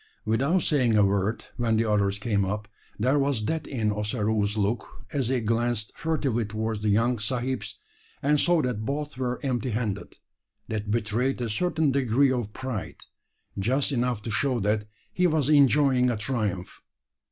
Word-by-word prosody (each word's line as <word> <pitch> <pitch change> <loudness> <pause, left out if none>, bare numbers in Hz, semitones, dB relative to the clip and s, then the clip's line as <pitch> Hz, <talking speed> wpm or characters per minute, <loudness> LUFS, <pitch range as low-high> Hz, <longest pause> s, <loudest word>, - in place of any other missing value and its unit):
Without 135 +11 +2
saying 125 -7 +3
a 105 - +6
word, 100 +3 0
when 115 -2 +1
the 115 - +2
others 100 -2 +1
came 105 -2 0
up, 105 +2 -3 0.3
there 130 +7 +2
was 135 -6 0
that 160 +3 -2
in 110 -5 0
Ossaroo's 105 0 0
look 105 +3 -2
as 135 -5 0
he 130 -1 +1
glanced 115 -1 0
furtively 140 -8 0
towards 110 +1 -3
the 105 0 0
young 115 +3 +2
sahibs, 120 -2 -3 0.4
and 145 +1 +2
saw 175 -1 +3
that 120 -4 -2
both 145 +4 -3
were 125 -1 -1
empty 125 -1 -1
handed 105 -3 -3 0.5
that 105 -1 -3
betrayed 115 +5 0
a 120 -2 -2
certain 160 +4 +1
degree 130 0 +3
of 120 -5 -2
pride 130 -4 -5 0.6
just 130 +9 +1
enough 120 -4 0
to 115 - -4
show 125 +4 +1
that 105 +1 0 0.3
he 180 0 +3
was 155 -4 +1
enjoying 140 -3 +5
a 120 - 0
triumph. 105 -6 -3
120 Hz, 165 wpm, -26 LUFS, 105-135 Hz, 0.6 s, a